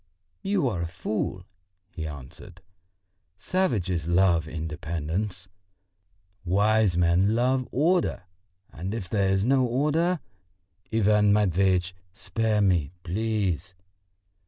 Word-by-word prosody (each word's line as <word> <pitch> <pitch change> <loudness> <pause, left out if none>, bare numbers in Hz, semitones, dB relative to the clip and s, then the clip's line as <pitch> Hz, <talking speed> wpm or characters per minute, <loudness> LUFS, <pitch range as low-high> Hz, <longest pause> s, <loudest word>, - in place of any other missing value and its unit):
"You 195 -7 +1
are 95 -8 -2
a 85 - -2
fool," 90 +1 -4 0.5
he 80 -2 -5
answered. 75 +6 -11 0.7
"Savages 100 - -1
love 85 -2 +3
independence, 80 +4 -4 1.0
wise 100 +1 +2
men 90 +5 +3
love 130 +2 +1
order; 165 - +1 0.5
and 95 +6 -5
if 100 -6 -5
there 100 0 +1
is 95 0 +2
no 130 +3 +3
order...." 150 +8 +1 0.7
"Ivan 105 -1 +3
Matveitch, 95 -2 +2 0.2
spare 110 -1 -1
me, 90 -8 +2
please!" 95 -3 -2
95 Hz, 100 wpm, -26 LUFS, 85-115 Hz, 1.0 s, love